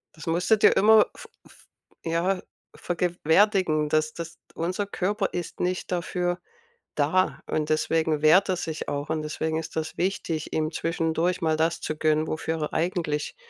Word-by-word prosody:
Das 160 Hz, -, -11 dB
musste 180 Hz, +7 st, +3 dB
dir -, -, +5 dB
immer 215 Hz, +1 st, +6 dB
v 475 Hz, -, -11 dB, 0.2 s
v -, -, -19 dB, 0.5 s
ja, 175 Hz, +3 st, 0 dB, 0.3 s
vergegenwärtigen, 175 Hz, -2 st, +2 dB
das 155 Hz, 0 st, +1 dB
das 170 Hz, 0 st, -7 dB, 0.2 s
unser 180 Hz, +5 st, -2 dB
Körper 200 Hz, +1 st, -1 dB
ist 175 Hz, -2 st, -5 dB
nicht 180 Hz, +1 st, -2 dB
dafür 175 Hz, 0 st, -1 dB, 0.6 s
da 160 Hz, +6 st, +1 dB
und 155 Hz, -1 st, -1 dB
deswegen 155 Hz, -1 st, +1 dB
wehrt 180 Hz, +6 st, +6 dB
er 185 Hz, -, +1 dB
sich 160 Hz, -2 st, -5 dB
auch, 145 Hz, +1 st, -3 dB
und 160 Hz, -1 st, -1 dB
deswegen 160 Hz, +1 st, -2 dB
ist 160 Hz, 0 st, -7 dB
das 160 Hz, 0 st, -3 dB
wichtig, 170 Hz, -4 st, -2 dB
ihm 155 Hz, 0 st, -1 dB
zwischendurch 165 Hz, +2 st, -1 dB
mal 160 Hz, -1 st, +2 dB
das 165 Hz, +1 st, 0 dB
zu 155 Hz, -, -3 dB
gönnen, 155 Hz, 0 st, +1 dB
wofür 160 Hz, 0 st, -3 dB
er 150 Hz, -, -3 dB
eigentlich, 165 Hz, -, -1 dB
165 Hz, 160 wpm, -26 LUFS, 155-180 Hz, 0.6 s, immer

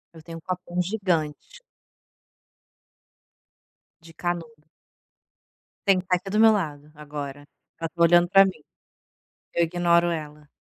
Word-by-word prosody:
Eu 160 Hz, -, -13 dB
tenho 165 Hz, 0 st, -9 dB
um -, -, -12 dB
copão 180 Hz, 0 st, -3 dB
gigante. 180 Hz, -, -2 dB, 2.4 s
De 165 Hz, 0 st, -15 dB
canudo. 160 Hz, -3 st, -5 dB, 1.2 s
Tem. 190 Hz, -2 st, +4 dB
Tá 180 Hz, 0 st, +1 dB
aqui 195 Hz, +2 st, -6 dB
do 210 Hz, -, +1 dB
meu 225 Hz, 0 st, +7 dB
lado, 150 Hz, -7 st, -3 dB
agora. 145 Hz, -1 st, -8 dB, 0.3 s
Ela 165 Hz, 0 st, -3 dB
tá 170 Hz, -, -6 dB
olhando 175 Hz, +1 st, +6 dB
para 195 Hz, +2 st, +7 dB
mim. 185 Hz, -6 st, -4 dB, 0.9 s
Eu 170 Hz, -, +2 dB
ignoro 170 Hz, 0 st, +2 dB
ela. 150 Hz, -2 st, -6 dB
170 Hz, 125 wpm, -25 LUFS, 150-180 Hz, 2.4 s, meu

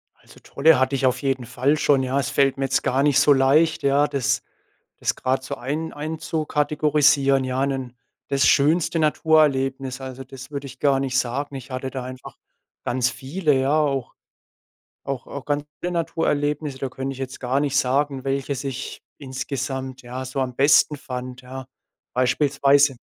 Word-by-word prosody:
Also -, -, -19 dB
tolle 150 Hz, -1 st, +4 dB
hatte 130 Hz, +1 st, +1 dB
ich 135 Hz, -, 0 dB
auf 130 Hz, 0 st, +1 dB
jeden 135 Hz, -3 st, -1 dB
Fall 140 Hz, +6 st, +1 dB
schon, 140 Hz, -2 st, +3 dB
ja. 130 Hz, +2 st, 0 dB
Es 135 Hz, -, -1 dB
fällt 135 Hz, -1 st, +2 dB
mir 135 Hz, -, 0 dB
jetzt 135 Hz, -, 0 dB
gar 135 Hz, +2 st, +1 dB
nicht 140 Hz, -2 st, +4 dB
so 145 Hz, +1 st, +6 dB
leicht, 145 Hz, +5 st, +3 dB
ja, 140 Hz, +1 st, +3 dB
das 135 Hz, -4 st, 0 dB, 0.6 s
das -, -, 0 dB
grade 130 Hz, +1 st, -1 dB
so -, -, -5 dB
ein 150 Hz, +6 st, -4 dB
einzukategorisieren, 150 Hz, -2 st, +1 dB
ja, 130 Hz, +1 st, -1 dB
'nen 130 Hz, -3 st, -4 dB, 0.3 s
das 140 Hz, -1 st, +3 dB
schönste 160 Hz, +4 st, +3 dB
Naturerlebnis? 135 Hz, -4 st, +2 dB
Also, 130 Hz, 0 st, -7 dB
das 130 Hz, +1 st, -11 dB
würde 140 Hz, -1 st, -5 dB
ich 130 Hz, 0 st, -12 dB
gar 140 Hz, -2 st, +3 dB
nicht 130 Hz, -1 st, -1 dB
sagen. 135 Hz, +4 st, -3 dB
Ich 130 Hz, -1 st, -8 dB
hatte 130 Hz, +1 st, -4 dB
da 130 Hz, -2 st, -5 dB
einfach 130 Hz, 0 st, -9 dB, 0.5 s
ganz 125 Hz, 0 st, +1 dB
viele, 150 Hz, +4 st, -1 dB
ja, 135 Hz, +3 st, +1 dB
auch 135 Hz, -4 st, -1 dB, 0.9 s
auch 135 Hz, -2 st, -4 dB
auch 140 Hz, -, -7 dB
ganz 145 Hz, 0 st, -1 dB, 0.2 s
schöne 180 Hz, 0 st, -2 dB
Naturerlebnisse. 150 Hz, -3 st, -1 dB
Da 135 Hz, -, -3 dB
könnte 135 Hz, +1 st, -4 dB
ich 135 Hz, -, -12 dB
jetzt 130 Hz, -1 st, -6 dB
gar 130 Hz, +2 st, 0 dB
nicht 140 Hz, -2 st, 0 dB
sagen, 135 Hz, 0 st, +1 dB
welches 135 Hz, 0 st, -2 dB
ich 135 Hz, -2 st, -5 dB, 0.2 s
insgesamt, 130 Hz, -1 st, -5 dB
ja, 125 Hz, +2 st, -6 dB
so 130 Hz, +1 st, -4 dB
am 125 Hz, -2 st, -2 dB
besten 145 Hz, +1 st, +4 dB
fand, 125 Hz, -1 st, -7 dB
ja, 130 Hz, +1 st, -8 dB, 0.5 s
beispielsweise 140 Hz, +1 st, +3 dB
135 Hz, 170 wpm, -23 LUFS, 130-145 Hz, 0.9 s, so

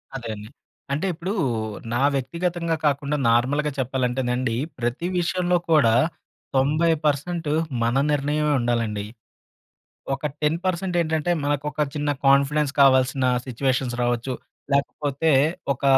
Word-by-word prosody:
అదే 120 Hz, -4 st, -5 dB
అండి. 105 Hz, +1 st, -10 dB, 0.4 s
అంటే 150 Hz, +7 st, 0 dB
ఇప్పుడూ 180 Hz, +4 st, -4 dB, 0.6 s
నా 120 Hz, -, +1 dB, 0.2 s
వ్యక్తిగతంగా 170 Hz, +5 st, -1 dB
కాకుండా 145 Hz, 0 st, +1 dB
నార్మల్‌గా 140 Hz, +6 st, +2 dB
చెప్పాలంటేనండి 125 Hz, -1 st, -1 dB, 0.2 s
ప్రతి 120 Hz, +8 st, -2 dB
విషయంలో 180 Hz, 0 st, +1 dB
కూడా 135 Hz, -8 st, +5 dB, 0.6 s
90 150 Hz, +5 st, +3 dB, 0.2 s
పర్సెంట్ 155 Hz, +3 st, 0 dB, 0.4 s
మన 120 Hz, +3 st, +1 dB
నిర్ణయమే 150 Hz, +1 st, +1 dB
ఉండాలండి. 115 Hz, -4 st, -1 dB, 1.1 s
ఒక 135 Hz, +2 st, -4 dB, 0.2 s
10% 175 Hz, +4 st, 0 dB
ఏంటంటే, 160 Hz, +1 st, 0 dB
మనకొక 145 Hz, +1 st, -1 dB
చిన్న 145 Hz, 0 st, -1 dB, 0.2 s
కాన్ఫిడెన్స్ 140 Hz, +1 st, +3 dB
కావాల్సిన 130 Hz, -1 st, +4 dB, 0.2 s
సిట్యుయేషన్స్ 130 Hz, 0 st, -1 dB
రావచ్చు, 120 Hz, +1 st, 0 dB, 0.4 s
లేకపోతే 140 Hz, +2 st, 0 dB, 0.4 s
ఒక 135 Hz, -, -15 dB
140 Hz, 105 wpm, -23 LUFS, 125-155 Hz, 1.1 s, కూడా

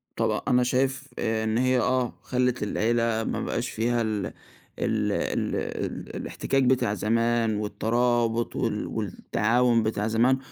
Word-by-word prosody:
طب -, -, 0 dB
أنا 125 Hz, 0 st, +4 dB
شايف 130 Hz, +2 st, 0 dB
آآ 110 Hz, 0 st, 0 dB
إن 110 Hz, +1 st, 0 dB
هي 130 Hz, 0 st, +3 dB
آه 125 Hz, 0 st, +1 dB
خلّت 125 Hz, -3 st, 0 dB
العيلة 115 Hz, +1 st, +1 dB
ما -, -, -2 dB
بقاش -, -, -2 dB
فيها 120 Hz, +1 st, 0 dB
ال 105 Hz, -4 st, -1 dB, 0.5 s
ال -, -, 0 dB
ال -, -, -1 dB
ال -, -, -4 dB
الإحتكاك 135 Hz, -1 st, -1 dB
بتاع 125 Hz, -4 st, +2 dB
زمان 115 Hz, +2 st, +1 dB
والترابط 115 Hz, +2 st, 0 dB
وال 105 Hz, -2 st, -1 dB
والتعاون 115 Hz, +3 st, +1 dB
بتاع 110 Hz, -1 st, -1 dB
زمان، 120 Hz, +4 st, +3 dB
115 Hz, 135 wpm, -26 LUFS, 110-125 Hz, 0.5 s, أنا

